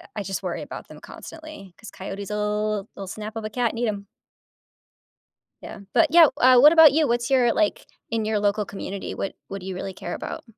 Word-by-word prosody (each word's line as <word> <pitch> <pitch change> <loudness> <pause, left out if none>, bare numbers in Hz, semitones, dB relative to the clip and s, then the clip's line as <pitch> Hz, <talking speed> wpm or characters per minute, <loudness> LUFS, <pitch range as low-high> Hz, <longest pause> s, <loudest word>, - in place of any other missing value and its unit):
I 205 - -3
just 195 0 -5
worry - - -4
about - - -9
them - - -13
constantly, 310 - -11
'cause 220 - -12
coyotes'll 210 +1 -3
they'll 195 -1 -7
snap 215 +3 -7
up 220 - -5
a - - -3
cat 235 0 -1
and 230 - -7
eat 240 - 0
'em. 200 -1 -4 1.6
Yeah, - - -8 0.2
but - - +4
yeah, 335 -1 +8 0.2
uh, 255 0 +7
what 300 +5 +8
about 320 -4 +8
you? 310 0 +2
What's 240 +1 -1
your 245 -3 +3
like, 315 -1 0 0.3
in 225 -2 -1
your 215 -1 0
local 205 0 0
community, 195 0 -6
what 195 - -3 0.2
what 195 -1 -7
do - - -10
you 190 - -4
really 190 +1 -5
care 175 - -7
about? - - -6
215 Hz, 210 wpm, -24 LUFS, 200-245 Hz, 1.6 s, yeah